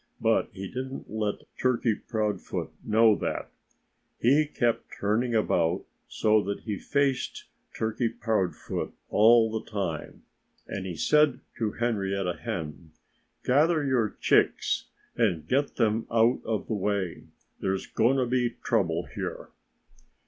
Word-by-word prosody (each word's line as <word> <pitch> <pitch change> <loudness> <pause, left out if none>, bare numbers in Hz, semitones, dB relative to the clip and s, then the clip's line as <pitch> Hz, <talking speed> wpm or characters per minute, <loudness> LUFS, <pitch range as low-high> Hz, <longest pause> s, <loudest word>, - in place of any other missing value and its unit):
But - - +2
he 95 +1 -6
didn't 130 +3 -6
let 105 -1 -2 0.2
Turkey 125 -3 +2
Proudfoot 105 -2 -3
know 110 +1 +5
that. - - -3 0.7
He 145 +5 +4
kept 120 -5 0
turning 115 +4 +1
about, 90 -4 +1 0.2
so 110 0 +3
that 100 +1 -4
he 105 -4 -4
faced 140 -2 0 0.3
Turkey 110 +2 0
Proudfoot 110 -5 -2 0.2
all 110 +1 +6
the 110 0 -4
time. 95 -7 -4 0.4
And 95 -1 -4
he 90 - -4
said 150 - +3 0.2
to 110 -3 0
Henrietta 100 -6 -1
Hen: 75 -2 -5 0.5
"Gather 155 +4 +3
your 125 -6 +1
chicks - - +2 0.3
and 90 -10 +1
get 140 +2 +1
them 115 -1 +1
out 115 +2 +3
of 110 -2 -1
the - - -3
way. 100 -3 -2 0.3
There's 95 0 -1
going 120 +4 +2
to 130 - +2
be 120 -1 0
trouble 85 -7 +1
here." - - -5
110 Hz, 125 wpm, -27 LUFS, 100-120 Hz, 0.7 s, all